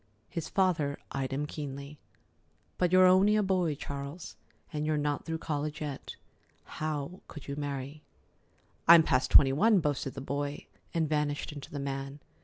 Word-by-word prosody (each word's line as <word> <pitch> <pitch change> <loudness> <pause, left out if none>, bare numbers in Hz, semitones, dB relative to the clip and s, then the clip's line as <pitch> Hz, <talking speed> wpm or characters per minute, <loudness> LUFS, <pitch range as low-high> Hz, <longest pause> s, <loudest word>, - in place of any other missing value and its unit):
His 165 - -4
father 165 -7 +1
eyed 135 -1 -3
him 140 +2 -1
keenly. 140 -1 -7 0.8
"But 180 -1 +2
you're 185 0 +7
only 190 +3 +5
a 210 - +3
boy, 180 -5 +1
Charles, 140 +4 -7 0.4
and 150 0 -2
you're 155 0 +1
not 145 -1 -1
through 165 0 -2
college 150 -1 -3
yet. 145 -3 -6 0.5
How 155 +2 -4
could 150 - -10
you 140 - -4
marry?" 140 0 -5 0.9
"I'm 170 -1 +9
past 130 -3 +1
twenty 135 -2 +7
one," 210 +7 +4
boasted 145 -4 -2
the 135 - -5
boy, 145 +2 -3 0.3
and 165 -2 0
vanished 150 -1 -1
into 145 -2 -9
the 145 - -6
man. 135 +1 -4
150 Hz, 160 wpm, -30 LUFS, 140-165 Hz, 0.9 s, I'm